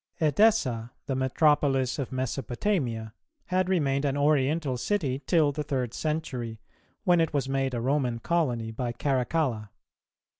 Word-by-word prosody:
Edessa, 145 Hz, -, +2 dB
the 135 Hz, -, -2 dB
metropolis 135 Hz, 0 st, +2 dB
of 135 Hz, -, -3 dB
Mesopotamia, 130 Hz, -, -2 dB, 0.3 s
had 185 Hz, 0 st, 0 dB
remained 140 Hz, -7 st, +1 dB
an 140 Hz, -1 st, 0 dB
Oriental 145 Hz, 0 st, +2 dB
city 140 Hz, -, -1 dB
till 160 Hz, -5 st, +4 dB
the 150 Hz, -, -4 dB
third 130 Hz, -5 st, -2 dB
century, 125 Hz, -8 st, -3 dB, 0.4 s
when 175 Hz, -4 st, +4 dB
it 165 Hz, -2 st, 0 dB
was 135 Hz, -2 st, 0 dB
made 135 Hz, -1 st, -1 dB
a -, -, -1 dB
Roman 130 Hz, -2 st, 0 dB
colony 120 Hz, -6 st, -1 dB
by 120 Hz, +1 st, -3 dB
Caracalla. 130 Hz, -3 st, -1 dB
135 Hz, 135 wpm, -27 LUFS, 125-155 Hz, 0.4 s, till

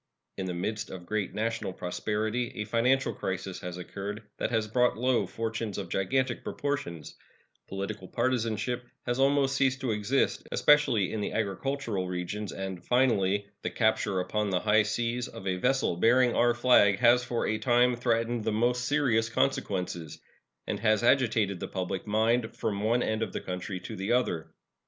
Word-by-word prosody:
In 95 Hz, -, -3 dB
the 90 Hz, -, -3 dB
midst 110 Hz, +5 st, -3 dB
of 90 Hz, -2 st, -8 dB
great 105 Hz, 0 st, -2 dB
national 110 Hz, -3 st, -2 dB
prosperity 110 Hz, +6 st, -2 dB
a 105 Hz, -, -3 dB
financial 125 Hz, +5 st, +2 dB
crisis 95 Hz, 0 st, -4 dB
has 90 Hz, -1 st, -6 dB
occurred 100 Hz, +4 st, -6 dB, 0.2 s
that -, -, 0 dB
has 110 Hz, -2 st, 0 dB
brought 125 Hz, +2 st, +2 dB
low 125 Hz, +1 st, +1 dB
fortunes 115 Hz, -2 st, -3 dB
of 95 Hz, -4 st, -5 dB
gigantic 130 Hz, +9 st, 0 dB
proportions; 85 Hz, -, -4 dB, 0.5 s
political 95 Hz, 0 st, -5 dB
partisanship 120 Hz, 0 st, -1 dB, 0.2 s
has 120 Hz, +1 st, -1 dB
almost 135 Hz, 0 st, +3 dB
ceased 135 Hz, -1 st, +2 dB
to 130 Hz, -4 st, 0 dB
exist, 105 Hz, +6 st, 0 dB
especially 130 Hz, -10 st, +3 dB
in 110 Hz, -, -2 dB
the -, -, -2 dB
agricultural 110 Hz, -1 st, -2 dB
regions; 90 Hz, +3 st, -4 dB
and, 95 Hz, -2 st, -5 dB
finally, 105 Hz, -6 st, +2 dB, 0.2 s
the -, -, -2 dB
capture 110 Hz, -4 st, +1 dB
upon 105 Hz, +3 st, -1 dB
the 90 Hz, -2 st, 0 dB
high 110 Hz, 0 st, +4 dB
seas 115 Hz, +3 st, -1 dB
of -, -, -10 dB
a 95 Hz, -1 st, 0 dB
vessel 130 Hz, -2 st, +1 dB
bearing 120 Hz, +6 st, +4 dB
our 120 Hz, 0 st, +3 dB
flag 120 Hz, -5 st, +5 dB
has 120 Hz, +2 st, +5 dB
for 120 Hz, -1 st, -2 dB
a 110 Hz, 0 st, 0 dB
time 125 Hz, 0 st, +3 dB
threatened 115 Hz, -1 st, 0 dB
the 110 Hz, -, 0 dB
most 120 Hz, +3 st, +1 dB
serious 120 Hz, -6 st, +2 dB
consequences, 90 Hz, -, -1 dB, 0.5 s
and -, -, -3 dB
has 110 Hz, 0 st, +2 dB
agitated 110 Hz, -7 st, +2 dB
the -, -, -4 dB
public 95 Hz, +1 st, -4 dB
mind 110 Hz, +2 st, +1 dB
from 105 Hz, -3 st, -2 dB
one 115 Hz, +3 st, +2 dB
end 110 Hz, 0 st, -1 dB
of 110 Hz, -4 st, -2 dB
the -, -, -2 dB
country 90 Hz, +1 st, -5 dB
to 110 Hz, +5 st, -7 dB
the 95 Hz, +2 st, -3 dB
other. 120 Hz, -10 st, 0 dB
110 Hz, 170 wpm, -29 LUFS, 100-125 Hz, 0.5 s, flag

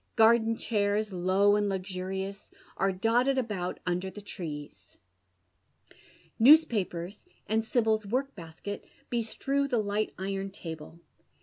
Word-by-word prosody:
Garden 225 Hz, 0 st, +5 dB
chairs, 205 Hz, -1 st, 0 dB
low 190 Hz, +3 st, +3 dB
and 205 Hz, -1 st, +1 dB
luxurious, 190 Hz, +1 st, -4 dB, 0.3 s
are 195 Hz, 0 st, +1 dB
dotted 240 Hz, +8 st, +2 dB
about 210 Hz, -8 st, -2 dB
under 180 Hz, +1 st, -1 dB
the 210 Hz, -, -10 dB
trees. 155 Hz, -7 st, -8 dB, 1.4 s
Newspapers, 220 Hz, -, +4 dB, 0.2 s
and 220 Hz, +2 st, +1 dB
Sibyl's 220 Hz, -3 st, +1 dB
work 265 Hz, +6 st, -1 dB
basket, 170 Hz, +4 st, -7 dB, 0.3 s
bestrew 270 Hz, +4 st, 0 dB
the 250 Hz, -3 st, 0 dB
li<fht 210 Hz, 0 st, -1 dB
iron 195 Hz, +1 st, -3 dB
table. 165 Hz, -4 st, -9 dB
205 Hz, 110 wpm, -29 LUFS, 185-225 Hz, 1.4 s, Garden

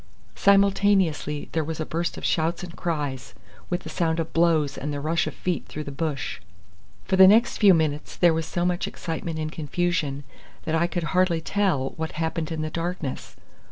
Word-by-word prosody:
Simultaneously 195 Hz, -7 st, +2 dB
there 160 Hz, -, 0 dB
was 160 Hz, +1 st, -5 dB
a 155 Hz, -, -1 dB
burst 165 Hz, +2 st, -2 dB
of -, -, -5 dB
shouts 165 Hz, +3 st, 0 dB
and 175 Hz, -1 st, -8 dB
cries, 145 Hz, -7 st, -3 dB, 0.3 s
with 175 Hz, 0 st, -1 dB
the -, -, -8 dB
sound 165 Hz, -2 st, 0 dB
of 165 Hz, 0 st, -3 dB
blows 160 Hz, -4 st, +2 dB
and 145 Hz, +2 st, -4 dB
the 145 Hz, -, -3 dB
rush 165 Hz, +4 st, 0 dB
of -, -, -4 dB
feet 180 Hz, -2 st, -3 dB
through 150 Hz, -, -6 dB
the 140 Hz, -, -7 dB
bush. 140 Hz, -2 st, -3 dB, 0.6 s
For 190 Hz, -, +1 dB
the 190 Hz, 0 st, +9 dB
next 225 Hz, +4 st, +4 dB
few 200 Hz, -4 st, +7 dB
minutes 155 Hz, -2 st, -1 dB
there 175 Hz, -2 st, +4 dB
was 160 Hz, 0 st, -2 dB
so 175 Hz, 0 st, -1 dB
much 180 Hz, -1 st, 0 dB
excitement 165 Hz, 0 st, -5 dB
and 155 Hz, 0 st, -3 dB
confusion 155 Hz, -2 st, -1 dB, 0.4 s
that 160 Hz, -, -3 dB
I 165 Hz, +1 st, +2 dB
could 175 Hz, -1 st, -3 dB
hardly 180 Hz, -2 st, +3 dB
tell 160 Hz, -7 st, 0 dB
what 160 Hz, 0 st, -4 dB
happened 160 Hz, 0 st, -2 dB
in 155 Hz, -1 st, -2 dB
the 155 Hz, -, -3 dB
darkness. 170 Hz, -5 st, -4 dB
165 Hz, 195 wpm, -25 LUFS, 155-175 Hz, 0.6 s, the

